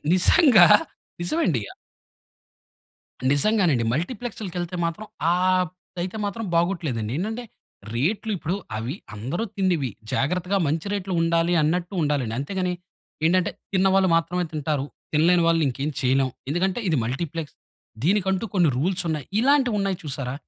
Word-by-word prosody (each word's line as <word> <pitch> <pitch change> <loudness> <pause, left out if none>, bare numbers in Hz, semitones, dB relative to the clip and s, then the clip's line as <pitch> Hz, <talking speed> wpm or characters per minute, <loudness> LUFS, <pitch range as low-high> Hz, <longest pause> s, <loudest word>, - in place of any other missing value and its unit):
నిజంగా 210 - +6 0.5
నిజం 175 - -1
అండి. 130 - +1 1.7
నిజంగానండి 150 - +3
మల్టీప్లెక్స్‌కెళ్తే 180 - -4
మాత్రం 170 +6 -4 0.3
ఆహ్, 185 +1 +2 0.3
అయితే 185 +4 -4
మాత్రం 220 +2 -3
బాగోట్లేదండి. 160 - 0
ఏంటంటే, 220 +7 -3 0.5
రేట్లు 195 - 0
ఇప్పుడు 165 +3 -2 0.2
అవి 120 +8 -3 0.2
అందరూ 130 - -3
తిండివి, 180 -9 +1 0.2
జాగ్రత్తగా 180 +7 0
మంచి 160 +6 -1
రేట్లు 195 -2 -3
ఉండాలి 165 +1 +2
అన్నట్టు 175 +5 0
ఉండాలండి. 140 -7 0
అంతేగాని, 180 +5 -2 0.5
ఏంటంటే 180 +2 +3 0.2
తిన్న 190 0 +3
వాళ్ళు 190 -2 +4
మాత్రమే 170 +2 0
తింటారు, 150 -2 -1 0.3
తినలేని 170 +3 +4
వాళ్ళని 165 -2 +3
ఇంకేం 140 +4 -3
చేయలేం. 130 +1 +2 0.2
ఎందుకంటే, 185 +7 0
ఇది 155 - +2
మల్టీప్లెక్స్. 150 +6 -4 0.5
దీనికంటూ 190 +3 +1
కొన్ని 175 -5 +4
రూల్స్ 180 +6 0
ఉన్నాయి. 150 -4 -2
ఇలాంటివున్నాయి 230 -8 +2
చూసారా! 135 -3 -4
175 Hz, 120 wpm, -24 LUFS, 150-190 Hz, 1.7 s, నిజంగా